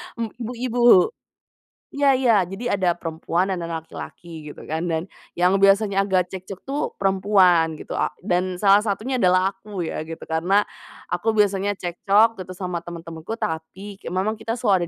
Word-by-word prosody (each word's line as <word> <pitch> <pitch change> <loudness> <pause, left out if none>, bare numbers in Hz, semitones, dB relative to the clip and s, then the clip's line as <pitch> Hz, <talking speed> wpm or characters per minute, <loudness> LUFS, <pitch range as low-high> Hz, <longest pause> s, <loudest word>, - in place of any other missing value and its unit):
Mmm, 230 -2 -3
ibu-ibu, 240 -4 +3 0.8
iya 280 -1 +3
iya. 240 -5 +4
Jadi 220 +6 -4
ada 185 -3 +1
perempuan 170 +3 -2
dan 185 - -2
ada 165 -1 -4
laki-laki 160 -1 -9
gitu - - -11
kan 160 +3 -3
dan 160 0 -1 0.3
yang 180 +2 +3
biasanya 195 0 +4
agak 185 -2 +1
cekcok 190 0 -7
tuh 280 +2 -3 0.2
perempuan 190 -4 +3
gitu - - -11
a - - +1 0.2
dan 185 -1 0
salah 195 +2 +5
satunya 220 +5 -2
adalah 185 0 +3
aku 195 -2 -7
ya 160 - -4
gitu 165 0 -8
karena 175 +6 +2 0.5
aku 220 +5 0
biasanya 205 -1 +2
cekcok 200 +5 +2
gitu 185 0 -7
sama 180 -2 -3
teman-temanku 165 +3 -7
tapi 190 +3 -5
ke - - -11
memang 195 +5 -1
kita 225 +1 -3
selalu 195 -7 +1
190 Hz, 160 wpm, -23 LUFS, 175-210 Hz, 0.8 s, salah